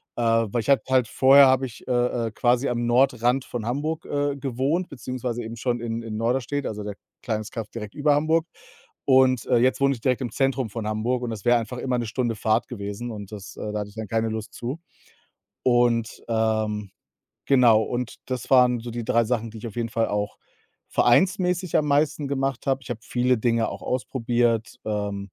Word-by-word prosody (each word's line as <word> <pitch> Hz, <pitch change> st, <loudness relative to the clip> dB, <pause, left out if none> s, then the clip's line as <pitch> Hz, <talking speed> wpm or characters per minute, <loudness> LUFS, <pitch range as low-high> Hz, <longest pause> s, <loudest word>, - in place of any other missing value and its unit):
Äh, -, -, -3 dB
weil 115 Hz, 0 st, +2 dB
ich 140 Hz, -, -6 dB
habe 140 Hz, -, +5 dB
halt 130 Hz, -3 st, +3 dB
vorher 135 Hz, +1 st, +7 dB
habe 130 Hz, 0 st, +3 dB
ich, 120 Hz, +1 st, -11 dB
äh, 120 Hz, -2 st, +1 dB
äh, -, -, -5 dB
quasi 125 Hz, +4 st, +1 dB
am 120 Hz, -1 st, -1 dB
Nordrand 125 Hz, 0 st, +2 dB
von 115 Hz, -3 st, -5 dB
Hamburg, 155 Hz, +5 st, -2 dB
äh, 145 Hz, -1 st, -1 dB
gewohnt, 135 Hz, +7 st, -1 dB
beziehungsweise 125 Hz, -2 st, -4 dB
eben 115 Hz, +1 st, -6 dB
schon 120 Hz, 0 st, -1 dB
in 115 Hz, 0 st, -3 dB
in 110 Hz, -1 st, -5 dB
Norderstedt, 130 Hz, +4 st, -1 dB
also 105 Hz, -1 st, -4 dB
der 105 Hz, -1 st, -5 dB, 0.3 s
kleines 110 Hz, -2 st, -3 dB
Kaff 110 Hz, -3 st, -5 dB
direkt 105 Hz, -3 st, -7 dB
über 145 Hz, -1 st, +3 dB
Hamburg. 160 Hz, +2 st, +2 dB, 0.6 s
Und, 130 Hz, -2 st, +4 dB
äh, 120 Hz, -, +4 dB
jetzt 130 Hz, +3 st, +2 dB
wohne 140 Hz, 0 st, +4 dB
ich 115 Hz, -, -14 dB
direkt 130 Hz, 0 st, +1 dB
im 120 Hz, -, -3 dB
Zentrum 135 Hz, -4 st, 0 dB
von 110 Hz, -2 st, -4 dB
Hamburg 115 Hz, +4 st, -1 dB
und 120 Hz, -, -2 dB
das 110 Hz, -1 st, -7 dB
wäre 120 Hz, 0 st, +5 dB
einfach 115 Hz, +2 st, -6 dB
immer 125 Hz, -1 st, -1 dB
1 120 Hz, -, -2 dB
Stunde 120 Hz, 0 st, -1 dB
Fahrt 110 Hz, +1 st, +1 dB
gewesen 105 Hz, +1 st, -5 dB
und 105 Hz, -1 st, -8 dB
das 100 Hz, -2 st, -9 dB
äh, 105 Hz, -, -4 dB
da 105 Hz, -, -1 dB
hatte 105 Hz, 0 st, -5 dB
ich 100 Hz, -, -18 dB
dann 110 Hz, -2 st, -5 dB
keine 115 Hz, +1 st, 0 dB
Lust 110 Hz, 0 st, -5 dB
zu. 130 Hz, +7 st, -5 dB, 0.8 s
Und, 120 Hz, -2 st, +2 dB
ähm, 110 Hz, -3 st, 0 dB, 0.5 s
genau 120 Hz, -5 st, +5 dB
und 120 Hz, +1 st, -3 dB
das 130 Hz, -3 st, -4 dB
waren 125 Hz, -2 st, +5 dB
so 120 Hz, -, -7 dB
die 120 Hz, 0 st, -4 dB
3 115 Hz, +1 st, +3 dB
Sachen, 115 Hz, -1 st, -1 dB
die 110 Hz, -, -10 dB
ich 115 Hz, -, -8 dB
auf 105 Hz, -, -10 dB
jeden 115 Hz, -1 st, -1 dB
Fall 115 Hz, +1 st, 0 dB
auch 105 Hz, 0 st, -2 dB, 0.5 s
vereinsmäßig 180 Hz, +5 st, +2 dB
am 150 Hz, -, +1 dB
meisten 145 Hz, 0 st, +1 dB
gemacht 135 Hz, -2 st, -2 dB
habe. 135 Hz, 0 st, +1 dB
Ich -, -, -13 dB
habe 115 Hz, -, -4 dB
viele 125 Hz, 0 st, +1 dB
Dinge 115 Hz, 0 st, +1 dB
auch -, -, -8 dB
ausprobiert. 120 Hz, -2 st, 0 dB
Ähm 105 Hz, -2 st, -2 dB
120 Hz, 205 wpm, -24 LUFS, 110-130 Hz, 0.8 s, vorher